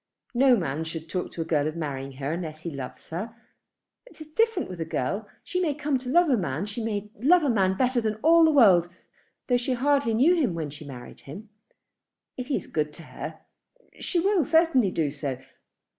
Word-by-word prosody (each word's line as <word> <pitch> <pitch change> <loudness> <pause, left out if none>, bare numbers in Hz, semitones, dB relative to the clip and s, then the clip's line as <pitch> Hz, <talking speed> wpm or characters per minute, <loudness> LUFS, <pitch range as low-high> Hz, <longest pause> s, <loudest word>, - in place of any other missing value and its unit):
No 255 +1 +5
man 160 - -2
should 160 0 -6
talk 180 +2 -3
to 165 - -3
a - - -13
girl 150 -2 +1
of 155 - -4
marrying 140 -4 -4
her 135 +2 -4
unless 160 -3 -5
he 170 - -4
loves 135 +1 -8
her. 215 +8 -5 0.7
It - - -15
is 310 - -8
different 450 0 +1
with 180 -2 -7
a - - +1
girl. 195 +7 -3
She 365 -2 -2
may 320 -6 0
come 295 -2 -1
to 250 0 -7
love 345 +5 +4
a 265 -5 +3
man. 165 -2 -2
She 210 +2 -5
may 210 -2 -3
love 330 +8 +5
a 280 - +2
man 190 -4 +2
better 250 0 +2
than 215 -1 -1
all 330 +2 +6
the 320 - +5
world, 190 - +6 0.6
though 245 - +2
she 245 +2 -1
hardly 275 -2 +2
knew 280 +10 +5
him 275 - +1
when 155 -3 -4
she 150 +1 -10
married 125 -3 -10
him. 200 +10 -10 0.9
If 250 -1 -6
he 280 - 0
is - - -3
good 150 -1 -2
to 165 - -11
her, - - -8 0.6
she 355 - 0
will 385 -1 +2
certainly 320 - +3
do 155 -5 -1
so. 140 -3 -4
210 Hz, 215 wpm, -26 LUFS, -, 0.9 s, all